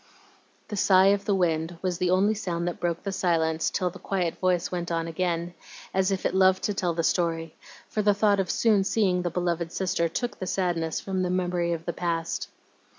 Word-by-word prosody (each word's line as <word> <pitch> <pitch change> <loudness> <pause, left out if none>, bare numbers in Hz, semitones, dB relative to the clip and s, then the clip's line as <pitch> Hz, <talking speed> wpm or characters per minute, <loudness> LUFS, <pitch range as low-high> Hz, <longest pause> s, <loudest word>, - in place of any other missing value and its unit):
The 210 - -4
sigh 190 -1 +5
of 200 0 -2
the 200 - +2
wind 165 -2 0
was 180 -1 -1
the 180 - +1
only 195 +4 +3
sound 175 -5 -3
that 175 - -3
broke 170 -1 -2
the 195 - -2
silence 165 -4 +1
till 180 -2 -1
the - - -12
quiet 180 -4 -2
voice 180 -2 +1
went 175 -1 -3
on 165 -1 0
again, 170 0 -2 0.4
as 190 0 +2
if 190 - -2
it - - +1
loved 190 0 +4
to 205 - 0
tell 180 -4 -1
the 165 - 0
story, 165 -2 0 0.3
for 215 - -1
the 205 -1 +3
thought 205 -1 +3
of 190 -3 -1
soon 215 -4 +3
seeing 190 -3 +1
the 175 - -1
beloved 170 -1 -2
sister 180 -3 0
took 245 +8 -3
the 185 - -4
sadness 170 -4 -1
from 190 -1 -2
the 180 - 0
memory 180 -1 0
of 165 -1 -3
the 170 - -2
past. 165 -2 -2
180 Hz, 215 wpm, -26 LUFS, 170-190 Hz, 0.4 s, sigh